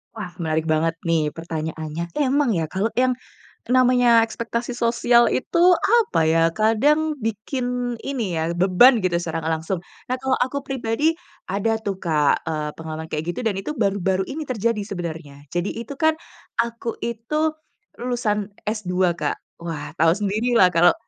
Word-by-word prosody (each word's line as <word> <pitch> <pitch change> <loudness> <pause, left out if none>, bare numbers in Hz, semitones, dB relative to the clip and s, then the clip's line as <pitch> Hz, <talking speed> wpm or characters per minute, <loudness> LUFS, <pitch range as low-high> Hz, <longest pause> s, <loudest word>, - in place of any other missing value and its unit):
Wah 210 -5 -6
menarik 160 -1 0
banget 160 +1 +2
nih 155 -3 +1
pertanyaannya. 160 0 -4
Emang 280 0 +2
ya 165 -2 0
kalau 195 +4 0
yang 255 +1 +3 0.5
namanya 245 -2 +5
ekspektasi 235 +2 -3
sosial 235 0 +3
itu 340 +6 0 0.2
apa 435 - +3
ya, 160 +1 +3
kadang 290 +8 +2
bikin 245 +2 -2
ini 225 -12 -2
ya, 165 +2 -1
beban 195 +6 +5
gitu 180 -2 +1
secara 165 -1 -4
nggak 160 +1 +1
langsung. 170 +3 -3 0.3
Nah 255 - 0
kalau 265 -1 +1
aku 270 +3 -1
pribadi 270 +2 0 0.4
ada 205 +3 +1
tuh 195 -3 -3
Kak, 155 -3 +1
eee, 155 -2 -2
pengalaman 160 0 -6
kayak 155 +1 -2
gitu - - -4
dan 220 -4 0
itu 300 +10 -5
baru-baru 195 -4 +1
ini 310 +3 -4
terjadi 230 -2 0
sebenarnya. 165 -7 -6 0.2
Jadi 175 +2 -2
itu 230 +3 -6
kan, 315 0 +3 0.5
aku 235 0 -4
itu 235 +8 -1 0.5
lulusan 215 -4 -1
S2 185 -4 0
Kak. - - -1 0.2
Wah, 165 -4 -5
tahu 165 +1 +5
sendirilah 210 0 +3
kalau 175 +1 +5
210 Hz, 150 wpm, -22 LUFS, 165-245 Hz, 0.5 s, namanya